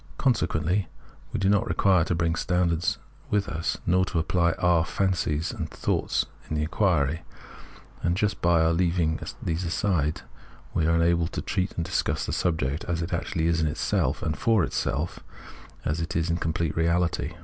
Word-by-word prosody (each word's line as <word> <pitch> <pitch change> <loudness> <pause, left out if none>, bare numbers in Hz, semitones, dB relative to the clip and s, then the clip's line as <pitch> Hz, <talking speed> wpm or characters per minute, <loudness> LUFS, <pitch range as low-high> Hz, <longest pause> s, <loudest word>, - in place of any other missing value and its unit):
Consequently 95 - +1 0.4
we - - -2
do 95 - +1
not 105 +3 +3
require 95 -6 +3
to 90 - 0
bring 80 0 +1
standards 90 +2 +1 0.3
with 105 -3 +1
us, 80 0 -2
nor 90 +2 +3
to 90 - -3
apply 85 0 +2
our 85 -2 +3
fancies 85 -4 0
and - - -5
thoughts - - 0 0.2
in 80 - -2
the 75 - 0
inquiry; 80 -3 +1 0.8
and 85 +1 +1
just 105 0 0
by 85 -1 +4
our 80 +1 +3
leaving 85 -2 +1 0.2
these 80 +2 -1
aside 85 -3 0 0.5
we 80 - +1
are 85 - +3
enabled 85 0 +2
to - - -2
treat 95 0 -1
and 85 - -2
discuss - - -1
the - - -3
subject 80 -3 0
as 85 -1 -1
it 85 - -4
actually 85 -1 -1
is 85 -1 +2
in 80 - +2
itself 75 - 0
and 75 - -2
for 110 -5 +3
itself, 75 +2 -2 0.7
as 75 +3 0
it 80 - -4
is 85 +1 +1
in 85 - +1
its - - -9
complete 80 -1 -1
reahty. 85 -1 +1
85 Hz, 180 wpm, -26 LUFS, 80-90 Hz, 0.8 s, by